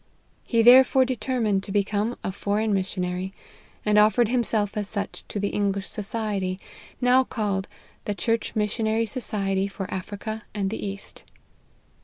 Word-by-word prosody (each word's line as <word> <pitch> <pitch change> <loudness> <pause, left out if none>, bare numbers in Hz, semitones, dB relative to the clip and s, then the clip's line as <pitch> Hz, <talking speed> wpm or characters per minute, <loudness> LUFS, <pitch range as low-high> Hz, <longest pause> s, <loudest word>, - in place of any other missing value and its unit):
He 230 -2 +2
there 250 +3 +10
fore 260 0 +3
determined 240 -5 0
to 195 - -7
become 205 +3 0
a - - -2
foreign 205 +2 0
missionary, 185 -1 -2 0.5
and 210 0 +5
offered 215 +2 +4
himself 225 -4 0
as 205 -1 -2
such 205 -1 -4
to 205 - -4
the 200 0 0
English 200 -1 -1
society, 200 -3 -2 0.4
now 250 +1 +5
called 205 -6 -2 0.2
" - - -32
The 205 - -2
Church 230 +2 -1
Missionary 220 +1 +1
Society 200 -5 -1
for 195 -1 -5
Africa 210 +3 -5
and 195 -1 -1
the 225 - -4
East." 200 0 -6
210 Hz, 150 wpm, -25 LUFS, 195-225 Hz, 0.5 s, there